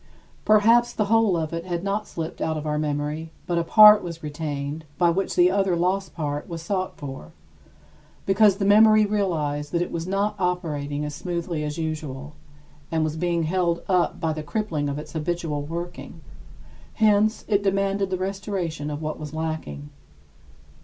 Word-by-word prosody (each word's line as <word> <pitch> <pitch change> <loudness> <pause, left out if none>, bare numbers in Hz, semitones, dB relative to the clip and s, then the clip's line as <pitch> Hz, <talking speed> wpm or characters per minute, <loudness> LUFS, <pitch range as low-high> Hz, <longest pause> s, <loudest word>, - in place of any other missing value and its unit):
Perhaps 225 +3 +5
the 210 - 0
whole 225 -6 +4
of 160 0 -3
it 165 0 -3
had 175 -1 -3
not 200 +2 -2
slipped 165 -1 -6
out 160 -1 -1
of 155 - -5
our 150 0 -1
memory; 150 +1 -2 0.2
but 175 -1 0
a - - 0
part 210 +4 +8
was 170 -2 -7
retained 150 0 -4
by 175 -1 +4
which 190 +3 -1
the 180 +1 +5
other 195 -2 +1
lost 185 +3 -1
part 145 -3 -3
was 165 -1 -5
sought 185 +1 -2
for, 135 - -8 0.9
because 200 0 +4
the 195 - -1
memory 215 +1 +6
realized 155 -8 -1
that 170 - 0
it - - -7
was 170 +1 -4
not 200 +2 0
operating 150 -5 -2
as 150 - -5
smoothly 170 -1 -3
as 150 +1 -4
usual 150 -3 -5 0.6
and 160 -1 +1
was 155 0 -2
being 170 0 0
held 170 0 0
up 180 -2 +1
by 160 -2 0
the 155 - -5
crippling 155 -3 -2
of 140 - -3
its 150 0 -8
habitual 160 -2 -2
working; 170 +4 -7 0.7
hence, 215 0 +3
it 205 -2 +2
demanded 195 0 0
the 185 - -1
restoration 185 -5 -3
of 150 +1 -5
what 155 0 -4
was 150 0 -7
lacking. 155 -2 -4
170 Hz, 175 wpm, -24 LUFS, 150-195 Hz, 0.9 s, part